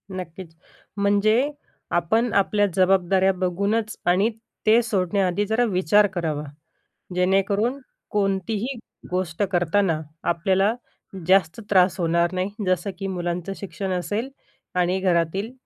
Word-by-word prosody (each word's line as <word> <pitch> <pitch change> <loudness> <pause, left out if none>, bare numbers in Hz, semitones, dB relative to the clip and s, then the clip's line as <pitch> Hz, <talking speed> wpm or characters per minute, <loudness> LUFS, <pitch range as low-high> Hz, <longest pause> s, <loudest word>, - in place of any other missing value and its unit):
नक्कीच. 170 -1 -8 0.4
म्हणजे 215 +7 +3 0.4
आपण 220 +7 +1
आपल्या 205 +1 +3
जबाबदाऱ्या 190 0 +3
बघूनच 200 +5 -1
आणि 190 +5 +3 0.4
ते 225 +2 +6
सोडण्याआधी 195 -1 0
जरा 220 +3 +2
विचार 190 +3 +4
करावा, 155 -4 -2 0.7
जेणेकरून 200 +7 +1 0.3
कोणतीही 205 +5 -1 0.3
गोष्ट 180 +1 -2
करताना 175 -1 +1 0.3
आपल्याला 190 +5 +2 0.5
जास्त 185 +1 +3
त्रास 185 -1 +4
होणार 170 +1 +2
नाही. 185 +2 -1 0.2
जसं 185 +2 0
की 195 - -4
मुलांचं 175 0 -3
शिक्षण 195 -1 -5
असेल 205 +7 -2 0.5
आणि 180 +1 +1
घरातील 185 +5 0
190 Hz, 105 wpm, -23 LUFS, 175-205 Hz, 0.7 s, ते